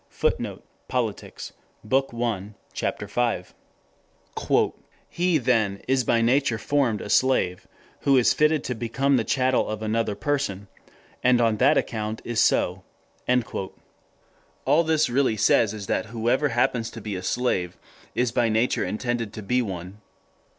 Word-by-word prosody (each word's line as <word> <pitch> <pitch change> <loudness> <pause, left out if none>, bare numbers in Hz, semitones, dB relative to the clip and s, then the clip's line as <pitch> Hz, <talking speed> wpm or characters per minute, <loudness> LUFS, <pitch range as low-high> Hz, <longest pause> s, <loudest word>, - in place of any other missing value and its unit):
[Footnote: - - -2 0.2
Politics, - - -3 0.3
Bk. 135 +4 +1
1, 110 -4 -3 0.2
Ch. - - -3 0.2
5.] 110 -4 -1 1.5
"He 175 -1 +1
then 110 -7 +1
is 130 0 +2
by 115 0 +2
nature 125 -1 +2
formed 120 -2 0
a - - -6
slave, 105 -6 +1 0.3
who 140 -1 +3
is 125 - +4
fitted 150 0 +2
to 125 - -2
become 125 +4 0
the 115 - +1
chattel 130 0 +1
of 110 0 -4
another 110 -1 0
person, 120 -10 -2 0.6
and 125 -1 +4
on 115 -2 +2
that 140 +6 +4
account 110 -1 -2
is 120 -2 -1
so." - - +2 1.8
All 160 +3 +4
this 160 -1 +2
really 125 -2 +1
says 105 +1 +4
is 105 -2 -6
that 110 - -1
whoever 120 +6 0
happens 120 -1 0
to 115 - -9
be 105 -2 -5
a 90 - -4
slave 95 -4 -1 0.4
is 120 -1 +1
by 120 0 +2
nature 110 +3 +1
intended 115 -1 -2
to 110 - -7
be 125 +5 +1
one. 95 -1 -6
115 Hz, 145 wpm, -25 LUFS, 110-130 Hz, 1.8 s, is